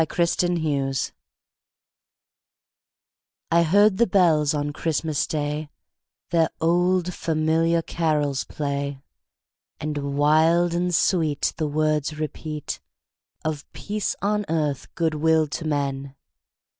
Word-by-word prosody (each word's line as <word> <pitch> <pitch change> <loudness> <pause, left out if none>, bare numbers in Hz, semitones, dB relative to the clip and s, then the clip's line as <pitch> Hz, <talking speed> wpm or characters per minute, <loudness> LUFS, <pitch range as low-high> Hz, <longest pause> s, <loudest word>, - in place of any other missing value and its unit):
CHRISTMAS 175 0 +1
BELLS 140 -4 -1 2.4
I 170 +1 +5
heard 200 +4 +4
the 235 +1 +4
bells 165 -6 +3
on 145 0 -2
Christmas 155 -1 -1
Day 150 0 -2 0.6
Their 165 -1 +3
old, 175 +2 +2
familiar 165 +1 +1
carols 150 -6 0
play, 140 -1 -3 0.8
And 145 -2 -3
wild 160 +4 +4
and 175 0 0
sweet 160 -7 +1
The 155 - -1
words 155 0 0
repeat 155 -1 -5 0.7
Of 155 -2 -4
peace 210 0 -3
on 210 +1 +1
earth, 150 -5 -1
good 165 -2 +1
will 160 +1 +3
to 160 - -5
men! 140 -2 -2
155 Hz, 105 wpm, -24 LUFS, 145-170 Hz, 2.4 s, I